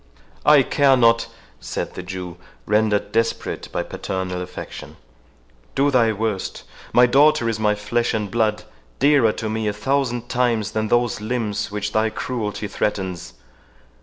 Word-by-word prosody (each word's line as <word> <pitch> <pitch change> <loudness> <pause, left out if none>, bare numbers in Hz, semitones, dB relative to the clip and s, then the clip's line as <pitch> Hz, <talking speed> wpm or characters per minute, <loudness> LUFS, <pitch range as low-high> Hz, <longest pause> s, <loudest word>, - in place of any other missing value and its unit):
"I 150 -2 +7
care 135 0 +3
not!" 115 -1 +4 0.3
said - - -4
the - - -6
Jew, 90 -1 -7 0.3
rendered 105 -1 +1
desperate 115 +1 -1
by - - -1
paternal 95 -1 -4
affection; 90 - -8 0.8
"do 140 +1 +3
thy 120 -4 +4
worst. 105 -2 -3 0.3
My 125 - +6
daughter 145 +1 +4
is 115 -1 -1
my 105 -1 +2
flesh 115 +3 -1
and 105 -3 -3
blood, 110 -2 +1 0.3
dearer 140 -5 +4
to 110 - -4
me 110 0 -2
a 105 - 0
thousand 120 +1 -1
times 120 -5 0
than 110 0 -1
those 120 -1 +1
limbs 110 -2 -2
which 105 0 -3
thy 110 +1 +2
cruelty 110 -3 -4
threatens. 95 -3 -3
110 Hz, 145 wpm, -22 LUFS, 105-120 Hz, 0.8 s, I